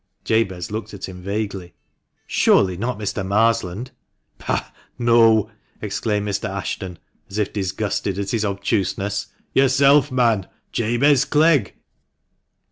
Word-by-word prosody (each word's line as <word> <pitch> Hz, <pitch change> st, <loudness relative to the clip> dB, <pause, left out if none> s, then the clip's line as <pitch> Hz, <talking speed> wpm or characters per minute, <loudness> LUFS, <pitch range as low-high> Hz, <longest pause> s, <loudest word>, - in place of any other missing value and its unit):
Jabez 95 Hz, -5 st, 0 dB
looked 110 Hz, 0 st, -5 dB
at 100 Hz, -, -6 dB
him 90 Hz, -1 st, -9 dB
vaguely. 100 Hz, -2 st, -4 dB, 0.5 s
"Surely, 95 Hz, -2 st, +3 dB
not 120 Hz, +6 st, -3 dB
Mr. 105 Hz, -2 st, -3 dB
Marsland! 110 Hz, +2 st, 0 dB, 0.2 s
" -, -, -51 dB
" -, -, -45 dB
Pah! -, -, -2 dB, 0.3 s
no! 115 Hz, -3 st, +4 dB
" -, -, -37 dB
exclaimed 105 Hz, -2 st, -1 dB
Mr. 100 Hz, -2 st, -2 dB
Ashton, 95 Hz, -2 st, -5 dB, 0.3 s
as 100 Hz, -, -6 dB
if 105 Hz, -2 st, -1 dB
disgusted 100 Hz, 0 st, -2 dB
at 100 Hz, -1 st, -3 dB
his 115 Hz, -2 st, 0 dB
obtuseness. 100 Hz, 0 st, -1 dB
" -, -, -43 dB
Yourself, 135 Hz, +1 st, +4 dB
man 115 Hz, -6 st, +2 dB
— -, -, -47 dB
Jabez 120 Hz, +5 st, +3 dB
Clegg." 150 Hz, -5 st, +3 dB
105 Hz, 135 wpm, -21 LUFS, 100-120 Hz, 0.5 s, no